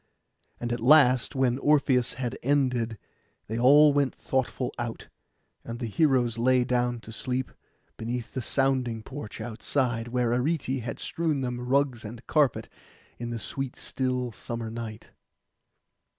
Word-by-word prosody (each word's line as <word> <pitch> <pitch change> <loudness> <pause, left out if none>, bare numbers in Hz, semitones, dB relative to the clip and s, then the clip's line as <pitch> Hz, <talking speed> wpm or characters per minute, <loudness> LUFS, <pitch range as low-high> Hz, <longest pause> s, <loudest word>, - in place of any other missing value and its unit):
And 120 0 -2
at 120 - -2
last, 130 0 +5
when 130 -1 +2
Orpheus 135 -4 +3
had 125 0 -3
ended, 125 -5 +1 0.5
they 110 +2 -3
all 145 +4 +7
went 140 -2 +1
thoughtful 130 -1 -2
out, 120 -1 -5 0.5
and 115 0 -6
the 120 - -4
heroes 120 -2 +2
lay 125 +1 +4
down 120 -1 0
to 110 - -10
sleep, 125 +3 -3 0.5
beneath 120 +1 -4
the 130 - -2
sounding 130 -4 0
porch 130 -4 -8
outside, 120 +1 -1
where 120 -1 0
Arete 130 0 0
had 115 - -5
strewn 160 -4 -1
them 125 -1 -3
rugs 130 -1 +1
and 115 +2 -9
carpets, 145 -6 +2 0.5
in 120 0 -4
the 120 - -3
sweet 130 +4 -4
still 125 -1 -2
summer 115 0 -5
night. 115 -2 -7
125 Hz, 140 wpm, -27 LUFS, 115-135 Hz, 0.5 s, all